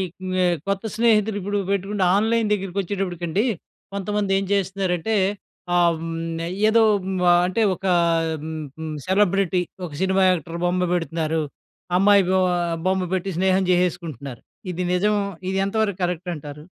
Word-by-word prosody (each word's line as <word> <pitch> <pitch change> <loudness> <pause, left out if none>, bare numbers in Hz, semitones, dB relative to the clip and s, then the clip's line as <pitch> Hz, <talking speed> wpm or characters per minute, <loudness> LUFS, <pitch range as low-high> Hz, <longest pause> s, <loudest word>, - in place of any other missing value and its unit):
క్మ్ 185 0 -5 0.3
కొత్త 195 +1 -1
స్నేహితులు 220 -2 +3
ఇప్పుడు 205 +2 -1
పెట్టుకుంటే, 200 0 0
ఆన్‍లైన్ 220 +1 +2
దగ్గరకి 195 -1 -2
వచ్చేటప్పటికండి, 185 0 -2 0.5
కొంతమంది 200 0 -1
ఏం 195 - -1
చేస్తున్నారంటే, 195 +1 0 0.6
ఆహ్, 170 -1 +4
హ్మ్, 165 0 -4 0.3
ఏదో 225 +1 +5 0.2
హ్మ్, 190 0 -2 0.3
అంటే 185 +5 0
ఓకా, 190 0 0 0.5
హ్మ్, 160 0 -5 0.2
హ్మ్, 160 -1 -4
సెలబ్రిటీ, 190 -2 +2 0.3
ఒక - - -13
సినిమా 190 0 +2
యాక్టర్ 170 -1 -3
బొమ్మ 180 0 +1
పెడుతున్నారు, 160 -1 -1 0.6
అమ్మాయి 200 +1 +5
బొ 190 0 +3 0.5
బొమ్మ 190 0 +1
పెట్టి 190 +1 -1
స్నేహం 190 0 +3
చేసేసుకుంటున్నారు. 165 -8 -2 0.3
ఇది 180 +1 -3
నిజం, 205 +4 +2 0.4
ఇది 190 - -1
ఎంతవరకు 200 -1 -1
కరెక్ట్ 180 0 -2
అంటారు? 150 0 -9
185 Hz, 130 wpm, -23 LUFS, 170-200 Hz, 0.6 s, ఏదో